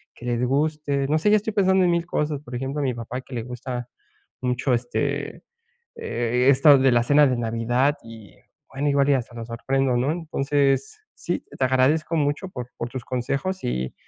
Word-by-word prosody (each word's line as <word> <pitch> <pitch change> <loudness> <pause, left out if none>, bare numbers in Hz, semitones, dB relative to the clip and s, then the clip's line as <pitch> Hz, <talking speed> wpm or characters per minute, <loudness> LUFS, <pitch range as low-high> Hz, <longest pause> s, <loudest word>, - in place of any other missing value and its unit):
que 120 - -11
les 120 0 -1
guste. 140 0 0
No 155 - +2
sé, 210 - +2
ya 215 - +6
estoy 215 +1 -3
pensando 190 -2 +3
en - - +3
1000, 170 0 0
cosas. 150 -4 -2
Por 125 -4 -12
ejemplo, 135 +4 -3
a - - -1
mi 130 -2 0
papá 120 +2 -6
que 130 - -14
le 115 - -3
gusta 125 0 -6 0.5
mucho, 125 +1 0
este, 120 +1 -2 0.6
eh, 125 - -1
esto 140 +1 +6
de 130 -1 +4
la 120 0 +4
cena 145 +3 +5
de 125 -2 +1
Navidad, 120 +5 +1
y 115 -3 -13 0.4
bueno, 140 +2 -1
igual 140 0 +3
y - - +5
hasta 120 -2 -3
lo 115 -1 -6
sorprendo, 130 +2 0
¿no? 135 +5 +1
Entonces, 150 - 0
sí, - - -4
te 130 - +2
agradezco 140 +6 +2
mucho 145 +5 0
por 125 -6 -7
por 120 - -3
tus 125 -2 -6
consejos 140 +9 -2
y 65 +1 -2
135 Hz, 195 wpm, -23 LUFS, 120-150 Hz, 0.6 s, ya